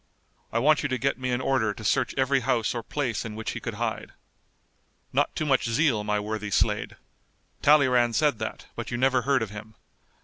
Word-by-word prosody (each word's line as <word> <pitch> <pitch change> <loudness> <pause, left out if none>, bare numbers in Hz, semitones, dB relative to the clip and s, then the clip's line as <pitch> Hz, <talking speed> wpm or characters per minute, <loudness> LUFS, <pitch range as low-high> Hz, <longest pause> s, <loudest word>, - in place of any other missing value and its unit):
I - - -1
want 150 +5 +4
you 145 - -2
to 130 - 0
get 135 +1 -1
me 130 0 -2
an 125 +1 0
order 110 -6 +1
to 110 - -10
search 105 - +1
every 135 +1 +2
house 120 -3 0
or 120 - -3
place 125 0 -2
in 110 -2 -6
which 110 0 -4
he - - -5
could - - -5
hide." - - -3 1.0
"Not - - +1
too 155 - -1
much 135 -5 +2
zeal, 115 -3 +2
my 105 0 0
worthy 105 0 -4
Slade. - - 0 0.7
Talleyrand 125 -5 +4
said 145 -3 +2
that, 110 - -5
but 115 - -5
you 120 - -3
never 130 0 +3
heard 135 -1 +2
of 105 - -6
him. 105 +1 -10
120 Hz, 205 wpm, -26 LUFS, 110-135 Hz, 1.0 s, want